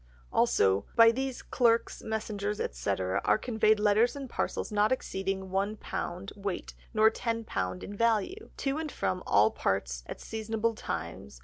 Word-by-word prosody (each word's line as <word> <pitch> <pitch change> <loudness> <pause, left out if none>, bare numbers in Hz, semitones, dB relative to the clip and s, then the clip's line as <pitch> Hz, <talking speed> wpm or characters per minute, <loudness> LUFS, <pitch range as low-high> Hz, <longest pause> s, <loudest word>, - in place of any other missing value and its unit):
Also, 95 +1 +3
"By 230 0 +8
these 265 +1 -3
[clerks, 230 -2 +2
messengers, 210 -2 -3
etc.] 90 +10 -1
are - - +4
conveyed 220 -2 +2
Letters 215 +4 +3
and 275 -1 -5
Parcels 235 - -2
not 210 +2 +3
exceeding 190 -6 -2
one 200 +3 0
Pound 180 0 -5
Weight, 200 -2 -4 0.2
nor 220 0 +5
Ten 230 0 -2
Pound 90 - -3
in 205 - -7
Value, 230 - 0
to 275 +2 -1
and 315 -2 -4
from 185 0 -1
all 105 +2 +5
Parts 60 -11 -1
at - - -7
Seasonable 225 +1 -2
Times, 70 - -5
viz. - - -18
215 Hz, 155 wpm, -30 LUFS, 185-230 Hz, 0.2 s, By